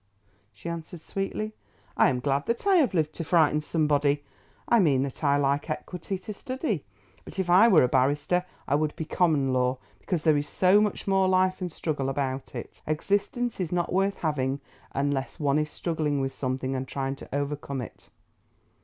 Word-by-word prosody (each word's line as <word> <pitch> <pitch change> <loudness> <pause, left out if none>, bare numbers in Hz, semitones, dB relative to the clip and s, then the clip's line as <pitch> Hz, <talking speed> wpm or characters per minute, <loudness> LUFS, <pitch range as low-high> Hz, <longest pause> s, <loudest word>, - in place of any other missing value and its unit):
she 105 +9 -11
answered 170 0 -6
sweetly. 195 +5 -4 0.4
"I - - +5
am 125 -2 -1
glad 140 +1 0
that 235 +8 -1
I 390 -2 +5
have 270 - +3
lived 155 -2 +1
to 165 - -4
frighten 155 -2 +3
somebody. 145 -2 +1 0.4
I 235 - +5
meant 140 -8 +3
that 140 +2 -6
I 140 -1 +4
like 140 +2 0
Equity 180 +4 -4
to 210 +3 -7
study; 255 - -3 0.4
but - - -10
if 185 -2 0
I 190 +6 +8
were 185 - +6
a - - +4
barrister, 145 +7 +2 0.2
I - - 0
would 150 +1 +1
be 160 - -4
Common 150 -6 +2
law, 125 0 +1 0.2
because 170 -4 -2
there 155 -2 +4
is 145 +1 -3
so 190 +3 +4
much 210 -2 -1
more 195 -1 +3
life 185 0 +2
and 180 -1 -3
struggle 145 -4 -2
about 135 -1 -3
it. 120 - -8
Existence 205 - -1
is 180 -4 -2
not 175 -1 0
worth 195 +2 +2
having 140 -4 -1 0.3
unless 140 +2 -2
one 145 -1 +2
is 150 0 -1
struggling 155 -3 -1
with 135 0 -2
something 130 0 -2
and 130 0 -3
trying 135 0 -3
to - - -11
overcome 140 -1 -3
it." 110 -6 -10
155 Hz, 190 wpm, -27 LUFS, 140-185 Hz, 0.4 s, I